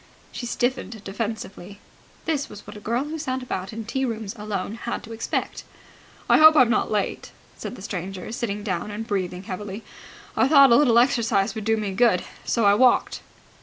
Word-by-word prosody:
She 240 - -5
stiffened 240 -3 -2
defensively. 200 -2 -5 0.5
This 295 -3 -1
was 205 - -11
what - - -10
a - - -8
girl 235 +5 -1
who 310 +2 -5
sat 260 -3 -3
about 190 -6 -4
in 225 0 -6
tea 265 +5 -2
rooms 220 -4 -3
alone 210 -2 -4
had 235 +1 -5
to 230 - -11
expect. 225 - -3 0.6
"Hope 315 0 +8
I'm 250 -5 +6
not - - +1
late," 210 -2 -2 0.2
said - - -7
the 190 - -11
stranger, 190 +1 -5
sitting 210 -3 -3
down 185 -1 -2
and 210 +2 -5
breathing 185 -4 -3
heavily. 200 +2 -6 0.5
"I - - +3
thought 275 -3 +7
a - - +8
little 240 -4 +5
exercise 230 -4 +2
would 220 -2 -6
do 225 0 +2
me 210 -2 -2
good, 190 -2 +3 0.2
so 230 - +1
I 200 - +6
walked." 245 +3 +3
220 Hz, 185 wpm, -24 LUFS, 200-245 Hz, 0.6 s, Hope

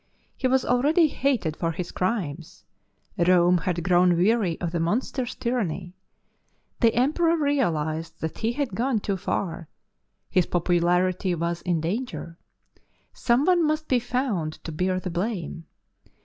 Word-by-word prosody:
He 260 - 0
was 260 0 +2
already 300 +6 +3
hated 250 - 0
for 165 0 -1
his 175 +1 -5
crimes; 175 -6 -3 0.5
Rome 175 0 +4
had 175 -1 -2
grown 180 0 +4
weary 195 -2 +2
of 170 -2 -3
the 170 - -1
monster's 245 +8 -1
tyranny. 190 -8 -2 0.9
The 230 -2 +3
Emperor 325 +7 +2
realized 165 - -1
that 160 - -4
he 230 +1 0
had 270 -5 -2
gone 240 +2 0
too 200 -1 -2
far; 170 -3 -3 0.6
his 180 -2 +1
popularity 180 +1 +1
was 170 +1 -2
in 175 -3 0
danger. 175 -2 -4 0.7
Someone 300 +9 +2
must 310 0 0
be 255 - +3
found 235 - -2
to 165 - -5
bear 185 +3 0
the 185 -1 -5
blame. 175 -2 -3
185 Hz, 135 wpm, -25 LUFS, 170-250 Hz, 0.9 s, Rome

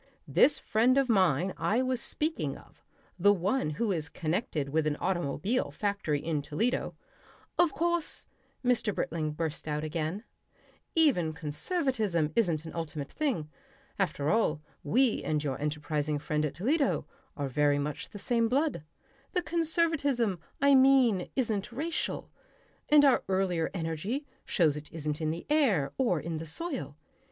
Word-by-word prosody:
This 300 - +4
friend 240 +5 +2
of 270 -2 +2
mine 185 - +3
I 210 +10 +1
was 255 -2 -1
speaking 315 +2 -2
of, - - -19 0.4
the 205 +3 +6
one 200 +1 +1
who 230 -3 +1
is 155 -5 -2
connected 160 - -2
with 155 +1 +1
an 150 - +1
automobile 185 - -1
factory 200 -8 -1
in 155 -1 -1
Toledo 160 - -1 0.3
" - - -28
"Of 350 -3 +5
course," 340 +3 0 0.4
Mr. 235 -4 +2
Britling 155 -2 -2
burst 155 0 -3
out 150 0 -1
again, 160 +5 -3 0.7
"even 250 - +3
conservatism 180 - -1
isn't 170 -8 +1
an 160 - -7
ultimate 155 -4 -5
thing. 235 - -2 0.5
After 155 -6 0
all, 210 -9 +2 0.2
we 240 - +2
and 155 -1 0
your 140 -2 -3
enterprising 150 0 -1
friend 150 +1 -1
at - - -8
Toledo, 275 - +1 0.3
are 145 -2 -1
very 145 +2 +2
much 145 +1 -3
the - - -9
same 230 +1 +1
blood. 280 - +1 0.5
The 360 - +1
conservatism, 310 - +1 0.2
I 280 +1 +5
mean, 260 -8 +5
isn't 220 -5 -1
racial. 310 +7 -3 0.6
And 295 -1 +7
our 270 - +4
earlier 185 -4 +1
energy 185 - -3 0.2
shows 160 -6 +2
it 150 0 -8
isn't 150 -1 -3
in 155 - 0
the 165 +2 -4
air 220 - +2
or 210 -11 +2
in 160 +1 -4
the 165 - -6
soil. 230 - -4
185 Hz, 150 wpm, -30 LUFS, 155-255 Hz, 0.7 s, And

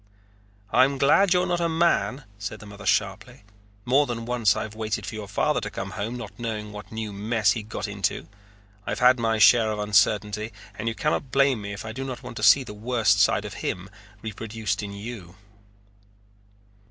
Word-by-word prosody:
"I 130 - +6
am 140 0 -2
glad 160 +8 +4
you're 180 0 +4
not 175 -1 0
a 170 - +1
man," 160 -4 +1 0.2
said 100 0 -5
the - - -12
mother 100 0 -9
sharply. 100 - -1 0.4
"More 140 +4 +3
than 115 -2 -4
once 120 -4 +2
I've 110 - -4
waited 110 -1 -3
for - - -6
your 110 -2 -6
father 100 - 0
to - - -4
come - - -6
home, 110 +4 -4
not 105 -5 -9
knowing 110 -3 -4
what 105 0 -10
new 110 -2 -5
mess 105 +1 +1
he 115 - -1
had 105 0 -11
got 105 0 -4
into. 100 -5 -2 0.6
I've - - -2
had 125 0 +5
my 115 -1 +1
share 110 +1 +6
of 105 - -3
uncertainty 105 +1 +1 0.2
and 110 +1 -5
you 115 - -1
cannot 150 -2 -1
blame 135 -4 +3
me 100 0 -6
if 100 +2 -7
I 110 - -5
do 130 +4 -5
not 130 -2 -6
want 120 - -8
to - - -5
see 140 - +6
the 105 - -9
worst 115 +1 +1
side - - +3
of - - -6
him 95 +2 -4 0.3
reproduced 110 0 -3
in 100 -1 -6
you." 100 -3 -8
110 Hz, 200 wpm, -25 LUFS, 105-125 Hz, 0.6 s, I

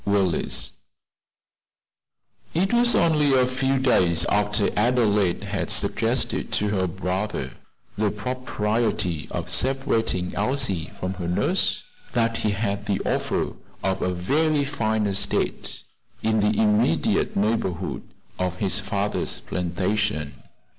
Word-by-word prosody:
WILLES 100 -4 +1 1.8
It 190 +6 +1
was 240 0 +5
only 150 -4 +3
a 130 -1 +4
few 130 +1 0
days 90 -10 +3
after 105 0 +1
Adelaide 105 -5 +2
had - - -3
suggested - - +1
to 105 - +2
her 95 -3 0
brother 95 +3 -3 0.5
the 105 -1 +2
propriety 105 -6 -1
of 85 0 -4
separating 115 -3 +1
Elsie 105 -6 0
from 95 +1 -2
her 90 -2 -5
nurse, 90 - +1 0.3
that 115 -1 +1
he 110 - 0
had 100 0 -2
the 100 -2 0
offer - - -1 0.3
of 95 -1 -1
a 90 - 0
very 145 - +1
fine 110 -6 -1
estate 100 0 0 0.4
in 110 0 +2
the 105 0 +1
immediate 105 -5 +2
neighborhood 100 -4 -1 0.4
of 90 -1 -1
his 95 +1 +1
father's 100 0 -1
plantation. 90 -3 -1
105 Hz, 115 wpm, -24 LUFS, 95-120 Hz, 1.8 s, was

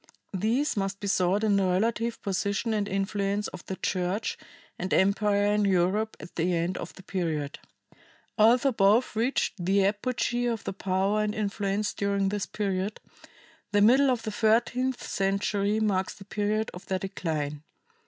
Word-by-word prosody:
These 225 +10 +1
must 195 -1 -2
be - - -6
sought 195 +1 +2
in 205 -2 +3
the 195 - +2
relative 230 +5 0
position 200 +2 -1
and 205 -2 0
influence 200 +1 -1
of - - -10
the 190 - -3
Church 185 +4 -1 0.4
and 185 +1 -3
empire 205 +1 +3
in 210 0 +2
Europe 195 +3 +1
at - - -11
the 175 +2 +1
end 170 +2 -1
of - - -6
the 190 - -13
period. 160 -6 -3 0.8
Although 240 +5 +5
both 220 +2 +3
reached 225 -4 0
the 195 +2 +3
apogee 240 +3 0
of 230 -3 -2
their - - -4
power 195 +2 0
and 210 0 -1
influence 205 0 -1
during 200 -1 0
this 205 -1 -2
period, 195 0 -2 0.7
the 205 - +4
middle 260 +6 +6
of 245 -3 0
the 215 - -3
thirteenth 240 +4 +1
century 200 +2 0
marks 195 -3 0
the 195 - -13
period 210 +2 -1
of 180 - -11
their 190 - 0
decline. 155 -6 -3
200 Hz, 160 wpm, -27 LUFS, 190-220 Hz, 0.8 s, middle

